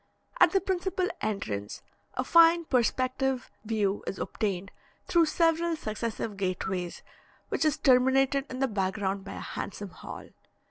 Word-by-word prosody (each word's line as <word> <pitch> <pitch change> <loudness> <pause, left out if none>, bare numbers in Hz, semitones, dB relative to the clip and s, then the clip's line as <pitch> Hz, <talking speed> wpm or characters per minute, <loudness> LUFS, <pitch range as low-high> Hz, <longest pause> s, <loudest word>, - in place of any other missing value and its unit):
At 325 - +7
the 390 - +3
principal 370 0 -1
entrance, 110 - -3 0.3
a - - 0
fine 335 0 +6
perspective 255 0 0
view 210 -2 0
is 195 - -3
obtained 195 -2 -3 0.3
through 335 -2 +4
several 330 +1 +2
successive 220 -4 -4
gateways, 185 -2 -3 0.5
which - - 0
is 310 -1 +2
terminated 270 +1 +3
in 255 - -5
the 270 +1 +1
background 195 -2 -1
by 200 - -7
a - - -7
handsome 205 0 -5
hall. - - -9
250 Hz, 135 wpm, -28 LUFS, 200-315 Hz, 0.5 s, At